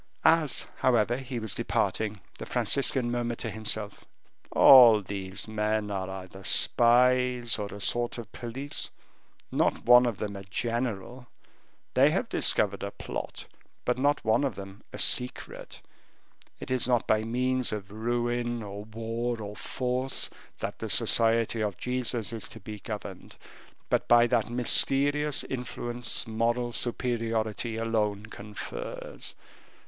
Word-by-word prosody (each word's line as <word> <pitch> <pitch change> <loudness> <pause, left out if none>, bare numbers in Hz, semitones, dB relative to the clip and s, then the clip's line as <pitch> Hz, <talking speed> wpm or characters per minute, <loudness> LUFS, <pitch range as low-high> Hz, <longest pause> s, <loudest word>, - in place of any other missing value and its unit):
As, 160 -5 +3
however, 120 -1 +2
he 130 -1 -6
was 110 -4 -3
departing, 110 -2 -1 0.2
the - - -7
Franciscan 130 -3 +1
murmured 120 -1 -2
to 115 - -5
himself: 110 -1 -4 0.5
"All 120 -5 +8
these 95 +1 -4
men 105 -1 -1
are 95 -1 -3
either 95 0 -9
spies, 125 +2 +3
or 105 - -3
a 100 - -9
sort 120 +4 0
of 115 -4 -8
police, 130 +4 -4 0.6
not - - 0
one 125 +1 +7
of 115 -4 -2
them 105 -1 -4
a 100 - -8
general; 120 +3 -3 0.7
they - - +5
have - - 0
all - - -32
discovered - - +2
a - - -3
plot, - - -6 0.4
but 125 +1 0
not 145 0 +1
one 110 +5 +3
of 135 -6 -1
them 100 +2 -10
a - - -8
secret. 125 0 0 0.8
It - - -7
is 125 -2 +3
not 120 -2 +2
by 110 0 +2
means 125 +2 +1
of 100 -2 -6
ruin, 120 +1 -2
or 100 0 -7
war, 115 +2 -3
or 105 -1 -7
force, 130 +3 -2 0.3
that - - -4
the - - -5
Society 115 0 +2
of 105 -4 -2
Jesus 125 -3 -1
is 115 - -5
to 110 - -10
be 105 +1 -8
governed, 100 -2 -8 0.5
but - - 0
by 120 0 +6
that 120 - +1
mysterious 140 +4 +3
influence 120 -2 -3
moral 120 +2 -1
superiority 115 -2 -1
alone 105 -2 -1
confers. 105 -1 -7
115 Hz, 140 wpm, -28 LUFS, 105-125 Hz, 0.8 s, All